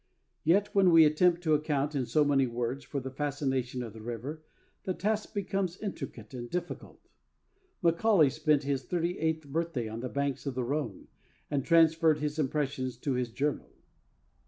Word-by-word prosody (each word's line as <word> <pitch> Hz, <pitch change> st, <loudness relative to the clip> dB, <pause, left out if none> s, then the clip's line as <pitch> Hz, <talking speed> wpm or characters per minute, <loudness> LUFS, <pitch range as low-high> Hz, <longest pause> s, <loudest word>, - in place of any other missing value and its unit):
Yet, 195 Hz, +6 st, +3 dB
when 195 Hz, -2 st, +5 dB
we 165 Hz, -2 st, +8 dB
attempt 170 Hz, +3 st, +3 dB
to 155 Hz, -2 st, +2 dB
account 150 Hz, -1 st, 0 dB
in 130 Hz, -4 st, -1 dB
so 150 Hz, -1 st, +3 dB
many 135 Hz, -2 st, +3 dB
words 120 Hz, +3 st, -3 dB
for 140 Hz, -, -4 dB
the 130 Hz, 0 st, -6 dB
fascination 135 Hz, -3 st, -2 dB
of 115 Hz, -3 st, -8 dB
the 110 Hz, -, -10 dB
river, 120 Hz, +7 st, -5 dB, 0.4 s
the 185 Hz, -, -2 dB
task 210 Hz, +4 st, -1 dB
becomes 195 Hz, -2 st, -1 dB
intricate 135 Hz, -, -7 dB
and 120 Hz, -1 st, -6 dB
difficult. 180 Hz, +5 st, -6 dB, 0.8 s
Macaulay 170 Hz, -3 st, +4 dB
spent 150 Hz, 0 st, +2 dB
his 140 Hz, -1 st, -1 dB
thirty 175 Hz, +2 st, -2 dB
eighth 160 Hz, -1 st, -1 dB
birthday 150 Hz, -5 st, -2 dB
on 110 Hz, +1 st, -6 dB
the 125 Hz, +1 st, -4 dB
banks 140 Hz, 0 st, -2 dB
of 135 Hz, -, -3 dB
the 130 Hz, -, -1 dB
Rhone, 125 Hz, -6 st, -3 dB, 0.4 s
and 140 Hz, -2 st, 0 dB
transferred 165 Hz, -1 st, +4 dB
his 150 Hz, +1 st, -3 dB
impressions 135 Hz, -3 st, -1 dB
to 135 Hz, +2 st, -2 dB
his 125 Hz, -1 st, -1 dB
journal. 145 Hz, +5 st, -2 dB
145 Hz, 170 wpm, -30 LUFS, 130-165 Hz, 0.8 s, we